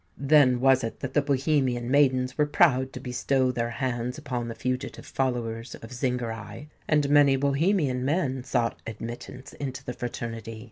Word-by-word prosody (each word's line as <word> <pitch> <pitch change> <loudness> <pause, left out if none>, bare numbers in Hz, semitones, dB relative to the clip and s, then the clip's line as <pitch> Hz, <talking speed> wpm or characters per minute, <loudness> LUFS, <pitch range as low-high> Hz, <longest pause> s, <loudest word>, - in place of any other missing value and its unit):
Then 135 -3 +4
was 135 -1 +4
it 115 - -5
that 130 0 -4
the 145 - +4
Bohemian 135 -3 0
maidens 130 -3 +3
were 150 -1 +2
proud 135 -4 +3
to - - -6
bestow 130 +1 0
their 120 -1 -2
hands 125 0 -3
upon 125 -6 -4
the 115 - -5
fugitive 130 0 -4
followers 120 -3 -2
of 115 +2 -11
Zingarai; 120 0 -4 0.2
and 150 -2 +3
many 145 -2 +6
Bohemian 140 -1 +1
men 135 -3 0
sought 120 -3 -1
admittance 120 +4 -8
into 135 -2 -5
the 125 - -4
fraternity. 115 -2 -5
130 Hz, 155 wpm, -26 LUFS, 120-140 Hz, 0.2 s, many